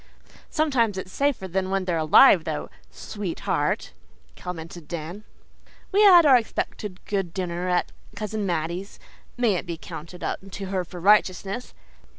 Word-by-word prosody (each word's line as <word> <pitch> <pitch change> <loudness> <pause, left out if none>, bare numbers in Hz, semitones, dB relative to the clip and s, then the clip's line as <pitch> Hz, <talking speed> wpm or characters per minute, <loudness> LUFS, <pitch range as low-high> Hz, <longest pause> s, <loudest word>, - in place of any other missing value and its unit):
"Sometimes 255 -10 +1
it's 185 0 -6
safer 275 -8 0
than 185 +1 -1
when 195 -1 0
they're 175 -2 0
alive 160 - +7
though, 75 - -4 0.2
sweetheart," 195 - -3 0.4
commented 165 -2 -8
Dan. 170 +5 -6 0.7
We 405 +2 +4
had 360 -5 +8
our 270 -3 +8
expected 210 -4 -4
good 195 -5 -2
dinner 180 -1 -2
at 180 0 +1 0.2
Cousin 215 0 -3
Mattie's 170 +3 -3 0.4
may 240 -4 +3
it 180 - -3
be 170 -1 -4
counted 170 +3 -9
unto 195 0 -5
her 190 -1 -2
for 175 +1 -10
righteousness. 200 +3 +2
190 Hz, 140 wpm, -25 LUFS, 175-215 Hz, 0.7 s, had